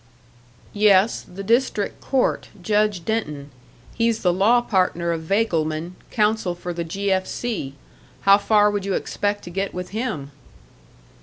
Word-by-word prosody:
"Yes, 205 Hz, 0 st, +4 dB
the 195 Hz, +2 st, -7 dB
district 230 Hz, -1 st, 0 dB
court; 265 Hz, -2 st, 0 dB
Judge 210 Hz, -1 st, +1 dB
Denton. 150 Hz, -11 st, -3 dB, 0.4 s
He's 230 Hz, -1 st, 0 dB
the 180 Hz, -2 st, +3 dB
law 210 Hz, +7 st, +4 dB
partner 180 Hz, -6 st, 0 dB
of 165 Hz, -1 st, -2 dB
Vagleman, 165 Hz, -3 st, 0 dB, 0.2 s
counsel 210 Hz, -4 st, +1 dB
for 175 Hz, 0 st, -5 dB
the 170 Hz, 0 st, -3 dB
'G. 195 Hz, +4 st, -2 dB
F. 190 Hz, 0 st, +1 dB
C.' 200 Hz, -, -4 dB, 0.5 s
How 200 Hz, +1 st, +6 dB
far 210 Hz, 0 st, +4 dB
would 205 Hz, -1 st, -2 dB
you 195 Hz, -1 st, -1 dB
expect 205 Hz, 0 st, -2 dB
to 175 Hz, -, -8 dB
get 195 Hz, +2 st, -3 dB
with 180 Hz, 0 st, -5 dB
him?" 200 Hz, -, -4 dB
195 Hz, 145 wpm, -22 LUFS, 175-215 Hz, 0.5 s, How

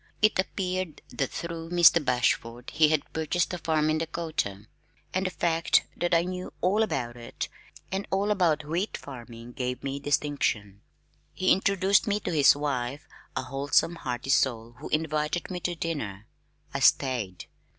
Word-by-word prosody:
It 215 Hz, -3 st, +3 dB
appeared 185 Hz, -3 st, -2 dB
that 135 Hz, -, -2 dB
through 165 Hz, -1 st, -5 dB
Mr. 170 Hz, -2 st, +6 dB
Bashford 120 Hz, -1 st, 0 dB
he 155 Hz, +1 st, +5 dB
had 155 Hz, -2 st, 0 dB
purchased 160 Hz, +3 st, 0 dB
a 180 Hz, -, -3 dB
farm 155 Hz, -1 st, +1 dB
in 155 Hz, -, +1 dB
Dakota, 155 Hz, -12 st, -3 dB, 0.5 s
and 185 Hz, 0 st, +1 dB
the -, -, -1 dB
fact 165 Hz, -2 st, +2 dB
that 175 Hz, -, -1 dB
I 165 Hz, -, +4 dB
knew 180 Hz, 0 st, -5 dB
all 195 Hz, +5 st, +2 dB
about 125 Hz, -, -1 dB
it 120 Hz, -1 st, -5 dB, 0.4 s
and 195 Hz, +1 st, -2 dB
all 200 Hz, +2 st, +1 dB
about 165 Hz, -7 st, +2 dB
wheat 175 Hz, +7 st, -2 dB
farming 120 Hz, -3 st, -10 dB
gave 125 Hz, -1 st, -3 dB
me 135 Hz, 0 st, -3 dB
distinction. 135 Hz, -8 st, -1 dB, 0.5 s
He 185 Hz, -, +2 dB
introduced 195 Hz, +1 st, +3 dB
me 205 Hz, 0 st, +1 dB
to -, -, -3 dB
his 145 Hz, -3 st, +6 dB
wife, 140 Hz, -1 st, -3 dB, 0.3 s
a -, -, -1 dB
wholesome 145 Hz, +4 st, +1 dB
hearty 125 Hz, -3 st, -3 dB
soul 120 Hz, -4 st, +2 dB
who 150 Hz, -, -7 dB
invited 155 Hz, +3 st, -1 dB
me 180 Hz, -, -3 dB
to 175 Hz, 0 st, -2 dB
dinner. 110 Hz, -, -4 dB, 0.5 s
I -, -, -1 dB
stayed. 115 Hz, -9 st, +2 dB
155 Hz, 160 wpm, -27 LUFS, 125-175 Hz, 0.5 s, Mr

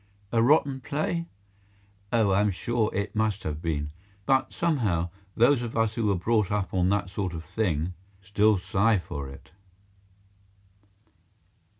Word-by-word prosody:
A 115 Hz, -, +3 dB
rotten 140 Hz, +1 st, +3 dB
play? 165 Hz, +5 st, -2 dB, 0.8 s
Oh, 110 Hz, -4 st, +3 dB
I 95 Hz, +1 st, +4 dB
am 105 Hz, -, +3 dB
sure 110 Hz, +3 st, 0 dB
it 100 Hz, +2 st, -3 dB
must 105 Hz, -3 st, 0 dB
have 75 Hz, 0 st, -4 dB
been. 75 Hz, -3 st, -2 dB, 0.3 s
But, 135 Hz, +2 st, +2 dB
somehow, 105 Hz, -, 0 dB, 0.3 s
those 120 Hz, +2 st, +5 dB
of 115 Hz, -1 st, -4 dB
us 115 Hz, -1 st, +2 dB
who 110 Hz, -1 st, -1 dB
were 100 Hz, -, +3 dB
brought 105 Hz, +2 st, +1 dB
up 100 Hz, -2 st, -1 dB
on 90 Hz, -1 st, +2 dB
that 100 Hz, -2 st, 0 dB
sort 95 Hz, -3 st, -3 dB
of 80 Hz, -1 st, -6 dB
thing, 90 Hz, -3 st, -1 dB, 0.3 s
still 105 Hz, +2 st, +3 dB
sigh 100 Hz, +4 st, +2 dB
for 70 Hz, -6 st, -6 dB
it. 75 Hz, +3 st, -13 dB
105 Hz, 150 wpm, -27 LUFS, 90-115 Hz, 0.8 s, those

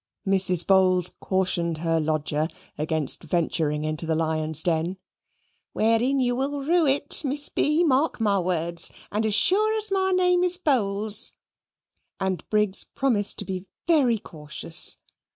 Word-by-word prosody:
Mrs. 185 Hz, -3 st, +4 dB
Bowls 185 Hz, -2 st, +3 dB
cautioned 180 Hz, -3 st, -1 dB
her 165 Hz, 0 st, -1 dB
lodger 155 Hz, 0 st, -1 dB, 0.3 s
against 155 Hz, -1 st, -1 dB
venturing 155 Hz, -3 st, -2 dB
into 155 Hz, +1 st, 0 dB
the 160 Hz, -, 0 dB
lion's 160 Hz, -1 st, +1 dB
den, 170 Hz, +2 st, -1 dB, 0.8 s
"wherein 230 Hz, +5 st, +1 dB
you 245 Hz, -1 st, 0 dB
will 275 Hz, +2 st, -3 dB
rue 330 Hz, +1 st, +2 dB
it, 280 Hz, +1 st, +3 dB
Miss 290 Hz, +1 st, -1 dB
B., 300 Hz, +4 st, +1 dB
mark 290 Hz, -1 st, +1 dB
my 205 Hz, -3 st, +1 dB
words, 170 Hz, -1 st, -1 dB, 0.2 s
and 215 Hz, +2 st, -1 dB
as 210 Hz, -, 0 dB
sure 430 Hz, -, +3 dB
as 430 Hz, -2 st, -1 dB
my 380 Hz, -1 st, +1 dB
name 360 Hz, -1 st, +2 dB
is 360 Hz, 0 st, +3 dB
Bowls." 215 Hz, -, 0 dB, 0.9 s
And 190 Hz, -3 st, -3 dB
Briggs 210 Hz, -2 st, +2 dB
promised 230 Hz, -7 st, 0 dB
to -, -, -3 dB
be 190 Hz, 0 st, -6 dB, 0.2 s
very 275 Hz, -9 st, +2 dB
cautious. 155 Hz, -3 st, -2 dB
195 Hz, 140 wpm, -24 LUFS, 165-275 Hz, 0.9 s, Mrs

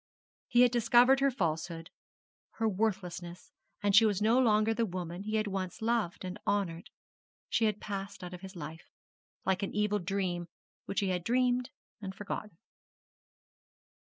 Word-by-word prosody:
He 240 Hz, -, +4 dB
had 250 Hz, -1 st, +6 dB
discovered 240 Hz, +3 st, +5 dB
her 275 Hz, 0 st, +4 dB
falsehood, 165 Hz, -, -2 dB, 0.6 s
her 225 Hz, -, 0 dB
worthlessness, 185 Hz, -4 st, -2 dB, 0.3 s
and 200 Hz, -1 st, +3 dB
she 220 Hz, -, +9 dB
was 205 Hz, -3 st, +2 dB
no 225 Hz, +4 st, +4 dB
longer 220 Hz, -2 st, +4 dB
the 230 Hz, -, 0 dB
woman 175 Hz, -1 st, -5 dB
he 215 Hz, +2 st, -3 dB
had 215 Hz, 0 st, +1 dB
once 190 Hz, -3 st, -3 dB
loved 220 Hz, -6 st, -1 dB
and 185 Hz, +1 st, -5 dB
honoured. 190 Hz, -4 st, -1 dB, 0.6 s
She 225 Hz, -, +2 dB
had 210 Hz, -1 st, 0 dB
passed 200 Hz, -1 st, -5 dB
out 180 Hz, 0 st, -7 dB
of 180 Hz, -, -8 dB
his 190 Hz, 0 st, -9 dB
life, 160 Hz, 0 st, -8 dB, 0.6 s
like 190 Hz, 0 st, +1 dB
an 195 Hz, -, -3 dB
evil 210 Hz, 0 st, +1 dB
dream 180 Hz, -2 st, -2 dB, 0.4 s
which 195 Hz, -, -1 dB
he 195 Hz, -, 0 dB
had 180 Hz, -2 st, -1 dB
dreamed 250 Hz, +2 st, +2 dB, 0.3 s
and 190 Hz, -1 st, -6 dB
forgotten. 205 Hz, -2 st, -6 dB
200 Hz, 155 wpm, -31 LUFS, 180-225 Hz, 0.6 s, she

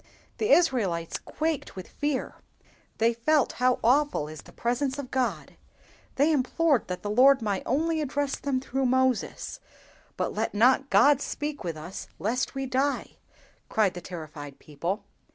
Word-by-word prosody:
The 430 Hz, -, 0 dB
Israelites 215 Hz, -, +2 dB
quaked 315 Hz, -2 st, -3 dB
with 185 Hz, -2 st, -7 dB
fear; 290 Hz, -2 st, -2 dB, 0.6 s
they 230 Hz, +1 st, +3 dB
felt 280 Hz, +5 st, +2 dB
how 255 Hz, 0 st, +4 dB
awful 265 Hz, -, +2 dB
is 155 Hz, -1 st, -9 dB
the -, -, -16 dB
presence 255 Hz, +3 st, -1 dB
of 275 Hz, -3 st, -6 dB
God; 260 Hz, -1 st, -2 dB, 0.6 s
they 290 Hz, +4 st, +3 dB
implored 290 Hz, -1 st, +2 dB
that 180 Hz, 0 st, -5 dB
the 205 Hz, -, -3 dB
Lord 260 Hz, +3 st, +5 dB
might 200 Hz, -3 st, -1 dB
only 315 Hz, +5 st, +1 dB
address 285 Hz, -1 st, -1 dB
them 275 Hz, -2 st, -1 dB
through 265 Hz, 0 st, -1 dB
Moses—'But 260 Hz, -1 st, -2 dB
let -, -, -2 dB
not 260 Hz, +5 st, +4 dB
God 285 Hz, -1 st, +5 dB
speak 295 Hz, -2 st, -4 dB
with 165 Hz, -3 st, -4 dB
us 175 Hz, +5 st, -7 dB
lest 245 Hz, +7 st, -1 dB
we 270 Hz, 0 st, -2 dB
die!' 265 Hz, +2 st, -1 dB, 0.5 s
cried 210 Hz, -4 st, +2 dB
the 175 Hz, -, -7 dB
terrified 155 Hz, -5 st, -8 dB
people. 170 Hz, +8 st, -4 dB
255 Hz, 150 wpm, -27 LUFS, 200-285 Hz, 0.6 s, Lord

